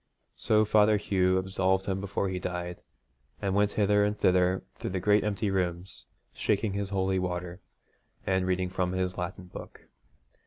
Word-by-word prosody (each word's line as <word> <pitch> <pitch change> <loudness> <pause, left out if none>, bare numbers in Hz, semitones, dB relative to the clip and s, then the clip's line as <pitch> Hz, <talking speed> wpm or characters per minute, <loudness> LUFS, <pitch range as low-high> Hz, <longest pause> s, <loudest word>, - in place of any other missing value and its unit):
So 110 0 +2
Father 105 0 +4
Hugh 95 -2 +1
absolved 95 0 0
him 95 -1 -2
before 100 0 -2
he 95 -1 -3
died, 90 -1 -5 0.6
and 95 -1 -1
went 105 +1 +2
hither 105 -1 +3
and 105 +1 0
thither 90 0 +2
through - - -5
the 95 0 -2
great 105 +3 +3
empty 105 -1 -1
rooms 90 -1 -3 0.3
shaking 105 -1 0
his 100 -1 -2
holy 95 -1 0
water, 90 0 -4 0.6
and 95 -1 +1
reading 90 0 0
from 90 0 -1
his 90 -1 -2
Latin 90 +1 -5
book. 90 - -10
95 Hz, 160 wpm, -28 LUFS, 90-100 Hz, 0.6 s, Father